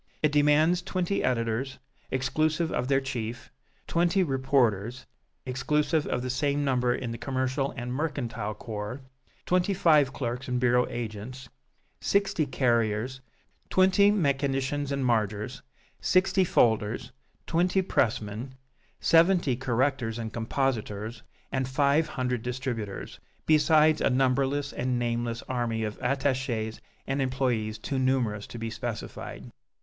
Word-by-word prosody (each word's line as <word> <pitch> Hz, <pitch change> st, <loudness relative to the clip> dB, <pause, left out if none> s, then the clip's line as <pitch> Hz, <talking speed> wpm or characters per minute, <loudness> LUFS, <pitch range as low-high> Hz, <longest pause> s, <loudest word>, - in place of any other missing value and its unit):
It 155 Hz, -, +4 dB
demands 150 Hz, +4 st, +4 dB
twenty 185 Hz, +2 st, -1 dB
editors, 120 Hz, +2 st, -1 dB, 0.3 s
exclusive 155 Hz, +5 st, 0 dB
of 125 Hz, -, -1 dB
their 135 Hz, 0 st, +3 dB
chief, 120 Hz, -3 st, -5 dB, 0.3 s
twenty 175 Hz, +3 st, +2 dB
reporters, 130 Hz, -, +1 dB, 0.4 s
exclusive 150 Hz, +4 st, 0 dB
of 125 Hz, -, -1 dB
the 130 Hz, -, -3 dB
same 145 Hz, +2 st, 0 dB
number 125 Hz, -2 st, +2 dB
in 125 Hz, -3 st, -4 dB
the 115 Hz, -, -6 dB
commercial 130 Hz, +1 st, -1 dB
and 125 Hz, +1 st, -4 dB
mercantile 120 Hz, -8 st, -3 dB
corps; 105 Hz, +4 st, -6 dB, 0.4 s
twenty 180 Hz, +2 st, +2 dB
five 150 Hz, -7 st, +4 dB
clerks 125 Hz, -1 st, -4 dB
and 125 Hz, -1 st, 0 dB
bureau 125 Hz, 0 st, +3 dB
agents, 120 Hz, +2 st, -6 dB, 0.5 s
sixty 200 Hz, -6 st, +1 dB
carriers, 120 Hz, 0 st, 0 dB, 0.5 s
twenty 190 Hz, +2 st, +5 dB
mechanicians 140 Hz, -5 st, 0 dB
and 135 Hz, -1 st, -1 dB
margers, 105 Hz, -3 st, 0 dB, 0.4 s
sixty 190 Hz, +1 st, +3 dB
folders, 110 Hz, -, +1 dB, 0.3 s
twenty 180 Hz, +3 st, +2 dB
pressmen, 115 Hz, -, -1 dB, 0.4 s
seventy 165 Hz, -5 st, +4 dB
correctors 125 Hz, -2 st, 0 dB
and 110 Hz, -2 st, -5 dB
compositors 115 Hz, -2 st, -2 dB, 0.3 s
and 130 Hz, -1 st, -1 dB
five 140 Hz, +4 st, +2 dB
hundred 125 Hz, -5 st, -2 dB
distributors, 125 Hz, -4 st, -4 dB, 0.3 s
besides 155 Hz, 0 st, +4 dB
a -, -, +3 dB
numberless 135 Hz, +2 st, +1 dB
and 125 Hz, 0 st, -1 dB
nameless 120 Hz, -1 st, -2 dB
army 120 Hz, -3 st, -2 dB
of 105 Hz, -1 st, -4 dB
attachés 130 Hz, -4 st, -1 dB, 0.3 s
and 135 Hz, +1 st, -1 dB
employés 125 Hz, -5 st, -1 dB
too 135 Hz, +4 st, -2 dB
numerous 125 Hz, -6 st, 0 dB
to -, -, -8 dB
be 115 Hz, 0 st, -4 dB
specified. 115 Hz, -2 st, -6 dB
130 Hz, 120 wpm, -28 LUFS, 115-145 Hz, 0.5 s, twenty